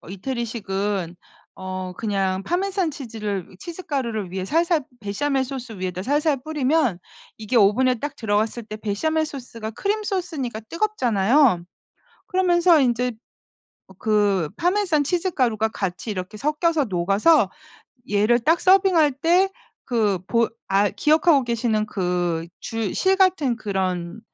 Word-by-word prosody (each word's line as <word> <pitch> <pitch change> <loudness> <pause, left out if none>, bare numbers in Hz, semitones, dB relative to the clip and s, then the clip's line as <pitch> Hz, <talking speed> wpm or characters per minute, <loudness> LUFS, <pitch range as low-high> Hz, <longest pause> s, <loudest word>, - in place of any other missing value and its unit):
어 - - -15
이태리식은 200 -4 -3 0.4
어 185 -1 -5
그냥 195 -3 -1
파마산 370 - -1
치즈를 215 - -5
치즈 345 +2 -8
가루를 230 -10 -3
위에 190 0 -3
살살 330 - +1 0.2
베샤멜 265 +7 -1
소스 250 -6 -7
위에다 185 0 -3
살살 290 +4 +1
뿌리면 295 - +1 0.4
이게 220 +3 -5
오븐에 235 +5 +4
딱 285 +5 -5
들어갔을 220 +1 -1
때 215 0 -7
베샤멜 315 +10 -1
소스가 245 -7 -7
크림 415 - -2 0.4
소스니까 235 -3 -4
뜨겁잖아요. 250 - +2 0.6
그러면서 355 -3 +4
인제 250 -1 +1
어 - - -4 0.9
그 205 -6 +2
파마산 355 -4 +2
치즈 355 +5 0
가루가 230 -7 +1
같이 195 -1 -4
이렇게 185 +1 -5
섞여서 300 +3 +1
녹아서 195 - +3 0.6
얘를 210 +4 +4
딱 325 +8 +2
서빙할 370 -5 +5
때 345 +7 +3 0.4
그 215 -6 +1
보 230 -1 +2 0.2
아 200 +1 +3
기억하고 300 - +3
계시는 230 -2 0
그 175 -4 -1
줄 225 -3 -3
실 380 0 +2
같은 360 -10 +2
그런 190 -3 -3
235 Hz, 285 characters per minute, -23 LUFS, 200-310 Hz, 0.9 s, 서빙할